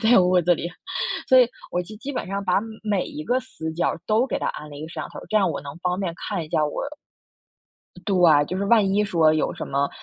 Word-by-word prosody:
在 235 +2 +6
屋 180 0 +4
子 175 +1 +3
里， 170 - -4 0.6
所 260 - +7
以 245 - +7 0.2
我 180 - 0
就 215 +5 -10
基 275 +6 -6
本 250 - -3
上 200 +1 -3
把 180 - +1 0.3
每 205 -4 0
一 150 - -7
个 250 +9 +1
死 160 -10 -6
角 170 - +1
儿 - - -6
都 225 +4 +3
给 - - -2
它 - - -2
安 150 0 -6
了 145 - -9
一 145 - -7
个 - - -11
摄 - - -6
像 - - -7
头 - - -10
儿， - - -10
这 215 - +1
样 195 -4 +3
我 145 - -4
能 140 +2 -9
方 180 +1 -1
便 180 -4 -2
看 195 -5 -3
一 - - -13
下 155 - +2
我 150 - -3 1.4
啊 145 -2 +6
对， - - -13
就 185 - -3
是 200 - -1
万 220 -2 +5
一 210 +1 +3
说 165 -5 +3
有 155 - 0
什 - - -5
么， 140 +1 0
180 Hz, 295 characters per minute, -24 LUFS, 155-210 Hz, 1.4 s, 所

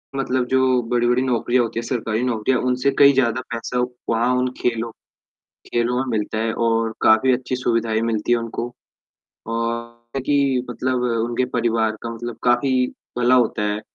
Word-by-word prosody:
मतलब 130 -2 0
जो 130 -1 +3
बड़ी-बड़ी 120 +1 +2
नौकरियाँ 125 -1 +1
होती 115 0 -3
हैं, 115 - -5
सरकारी 115 -3 -1
नौकरियाँ 125 +1 +1
उनसे 125 +2 +1
कई 140 0 +8
ज़्यादा 130 -2 +1
पैसा 120 +1 -3 0.3
वहाँ 115 +2 +2
उन 125 0 0
खेलों 115 -1 -1 0.8
खेलों 120 +1 +1
में 130 - 0
मिलता 105 +1 -3
है 110 0 0
और 115 -1 0
काफ़ी 110 +4 +5
अच्छी 130 0 -1
सुविधाएँ 115 -3 0
भी - - -2
मिलती 115 +1 0
हैं 120 - +4
उनको। 115 +1 -5 0.8
और 115 +2 -4
कि 140 -3 +2
मतलब 125 +1 -1 0.2
उनके 120 +2 -1
परिवार 115 -2 +1
का 115 - -5
मतलब 120 0 -6
काफ़ी 125 +1 +2 0.3
भला 125 +1 +4
होता 120 -4 +2
है, 105 +1 -3
120 Hz, 165 wpm, -21 LUFS, 115-125 Hz, 0.8 s, कई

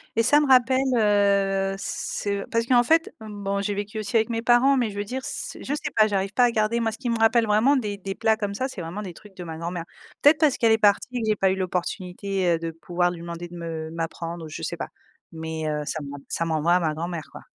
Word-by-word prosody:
et 230 - +3
ça 290 +5 +5
me 295 - +1
rappelle, 260 0 +5 0.2
heu, 200 -2 +2
ce 200 0 -3
parce 230 0 0
qu'en 240 -1 +4
fait, 325 +6 +2
mmh, 210 -2 -9
bon, 200 0 -1
j'ai 205 +1 -1
vécu 205 +2 -4
aussi 215 +2 -5
avec 225 +1 +3
mes 230 -1 -1
parents 245 +4 +4
mais 240 -4 +1
je 200 - -9
veux 205 - -1
dire 255 +5 -5
s - - -5
je 285 - -3
sais 295 0 -3
pas 215 -1 +5
j'arrive 195 -1 -1
pas 245 +2 +5
à 240 - +2
garder 220 +1 +1
moi, 225 -1 0
ce 220 - -8
qui 250 -3 -3
me 230 - +1
rappelle 225 +1 +4
vraiment 220 +7 +4
des 210 -6 -2
des 195 0 -5
plats 220 0 +2
comme 205 -2 -3
ça 260 +5 -2
c'est 195 - -7
vraiment 170 +6 -5
des 185 -4 -7
trucs 200 +1 -16
de 180 - -7
ma 160 -1 -7
grand-mère. 170 0 -4 0.4
Peut-être 295 +2 +6
parce 300 -5 +3
qu'elle 230 -2 +3
est 220 - +5
partie 205 +2 +3
que - - -1
j'ai 215 - +3
pas 190 -1 +2
eu - - 0
l'opportunité, 185 +1 -2
heu, 165 - -4
de 165 0 -4
pouvoir 175 +2 -1
lui 170 -1 -8
demander 170 0 -6
de 175 - -11
me 160 -1 -5
m'apprendre, 165 0 -5
ou - - -9
je - - -7
sais - - -3
pas, - - -4 0.5
mais 160 -1 -4
heu, 150 0 -1
ça 155 - -3
m'en 145 0 -7
ça 165 - -1
m'envoie 165 +1 +1
à 180 - +4
ma 155 -3 0
grand-mère, 165 -1 -5
quoi. - - -10
200 Hz, 270 wpm, -24 LUFS, 175-230 Hz, 0.5 s, Peut-être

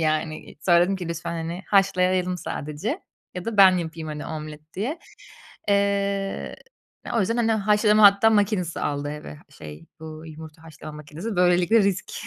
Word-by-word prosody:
Yani, 155 0 -2
sonra 170 +1 +4
dedim 190 +3 +2
ki 180 -3 -6
lütfen, 170 0 -4
hani, 170 +2 -5
haşlayalım 185 -2 +2
sadece 155 - -4 0.3
ya 180 -1 -6
da 230 -2 -4
ben 190 -2 +7
yapayım, 160 -1 -5
hani, 150 -1 -6
omlet 155 0 -8
diye. 250 - -3 0.7
Eee, 200 -1 0 0.6
o - - +3
yüzden 215 +4 0
hani 230 -2 +2
haşlama 210 0 +3
hatta 200 +2 +7
makinesi 200 -5 0
aldı 145 0 -2
eve, 145 - -8
şey, 75 +1 -11
bu 160 0 -9
yumurta 160 0 -11
haşlama 155 -1 -10
makinesi, 155 +8 -7
böylelikle 180 +4 +4
risk 195 -1 -1
180 Hz, 150 wpm, -24 LUFS, 155-200 Hz, 0.7 s, ben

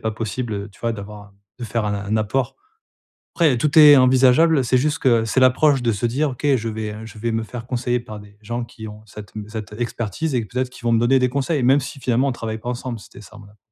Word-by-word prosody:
pas 110 - -2
possible, 110 +2 -4
heu, 100 +1 -5
tu - - -22
vois, 115 -1 -1
d'avoir, 105 0 -9
heu, - - -18 0.3
de - - -4
faire 115 -1 -2
un 105 - -1
un 100 +2 -2
apport. 110 +4 -1 0.8
Après, 150 -8 +3
tout 150 +4 +2
est 150 -2 +9
envisageable, 130 +3 +4
c'est 125 +2 +2
juste 150 +3 0
que 115 -4 +2
c'est 130 +4 +1
l'approche 130 +1 +4
de 115 -1 +1
se 105 +4 -1
dire: 140 +5 0
«OK, 130 +4 -5
je 115 -1 -4
vais 110 -1 -5
je 110 0 -12
vais 115 +1 -2
me 110 0 -1
faire 120 +1 -8
conseiller 125 -1 -1
par 110 -3 -9
des 105 0 -17
gens 120 +2 -4
qui 110 -2 -10
ont 105 0 -11
cette 105 -1 -11 0.2
cette 110 -1 -7
expertise 120 +5 -3
et 120 - +1
peut-être 125 +5 -3
qu'ils 125 - -15
vont 120 - +2
me 115 - +4
donner 130 +3 +4
des 125 0 +2
conseils», 140 +2 -1
même 135 +3 +4
si 140 +1 -8
finalement, 130 +2 +1
on - - 0
travaille 110 -2 -5
pas 120 +3 -5
ensemble. 120 -1 -5
C'était 100 - -14
ça. 110 +2 -14
Voilà. 105 0 -16
120 Hz, 255 wpm, -21 LUFS, 110-130 Hz, 0.8 s, est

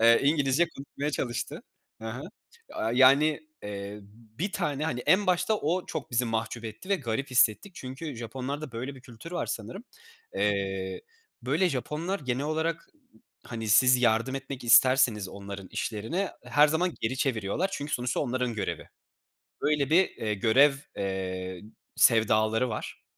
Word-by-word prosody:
Eee, 115 +1 +6
İngilizce 145 +2 +3
konuşmaya 140 +2 -4
çalıştı. 120 -4 -3 0.4
Hı 110 - -5
hı. 125 +5 -6 0.5
Aaa, 110 +1 -2
yani, 140 +4 +5 0.2
eee, 100 0 -6 0.4
bir 195 +5 -2
tane, 150 -6 -1
hani, 125 -6 -2
en 190 +10 +3
başta 180 +4 +2
o 175 +3 -1
çok 160 - -5
bizi 120 +1 +2
mahcup 115 0 -3
etti 110 - -8
ve 200 - +3
garip 130 -2 -3
hissettik. 125 - +3
Çünkü 135 +2 -7
Japonlarda 130 +4 -5
böyle 125 +5 -5
bir 130 - -13
kültür 130 +6 -11
var 175 - -2
sanırım. 120 - -5 0.5
Eee, 95 -2 -1 0.4
böyle, 185 -1 +2
Japonlar 160 +7 -3
genel 130 0 -2
olarak, 160 +2 -2 0.6
hani, 115 -2 -5
siz 125 +4 +6
yardım 120 +3 +2
etmek 135 -1 -6
isterseniz 120 -5 +5
onların 100 -1 -8
işlerine 120 - -2
her 145 +5 +5
zaman 170 +3 0
geri 120 +4 -1
çeviriyorlar. 125 - 0
Çünkü 145 +1 -4
sonuçta 125 0 -1
onların 125 -3 -1
görevi. 105 - -4 0.7
Böyle 145 -1 +1
bir, 180 +3 +5
eee, 105 -1 -3
görev, 130 +8 +5 0.2
eee, 95 -2 -3 0.3
sevdaları 110 +1 +4
var. 110 - -6
130 Hz, 145 wpm, -28 LUFS, 110-150 Hz, 0.7 s, Eee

